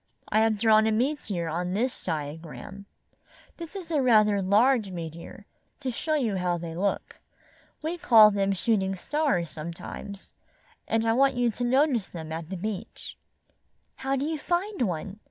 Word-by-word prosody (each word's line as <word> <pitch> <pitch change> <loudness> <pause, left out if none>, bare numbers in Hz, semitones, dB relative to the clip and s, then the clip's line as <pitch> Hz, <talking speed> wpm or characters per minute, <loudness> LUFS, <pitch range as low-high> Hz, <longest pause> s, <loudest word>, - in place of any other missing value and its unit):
"I 215 - +3
have 220 -1 +3
drawn 220 0 +4
a - - +2
meteor 220 - -1
on 175 +3 -2
this 245 +4 -1
diagram. 160 +5 -6 0.7
This 335 +3 -9
is 355 -4 -7
rather 220 -8 +4
a - - 0
large 215 +3 +3
meteor, 170 +2 -8 0.3
to 265 -2 -3
show 310 +6 -1
you 230 -9 0
how 180 -1 0
they 165 -1 -6
look. 195 +4 -2 0.6
We 335 +3 -3
call 220 -7 +7
them 200 -1 +1
shooting 195 -1 0
stars 190 - -1
sometimes, 170 +5 -8 0.5
and 225 0 +1
I 225 - +4
want 270 +2 +3
you 245 -1 +2
to 245 - -5
notice 255 -3 +2
them 160 -2 -8
at 160 0 -5
the 190 - -4
beach." 205 +1 -6 0.8
"How 270 +1 -1
do 275 +1 -1
you 315 0 -2
find 355 +3 -2
one?" 185 +4 -5
215 Hz, 160 wpm, -27 LUFS, 180-260 Hz, 0.8 s, call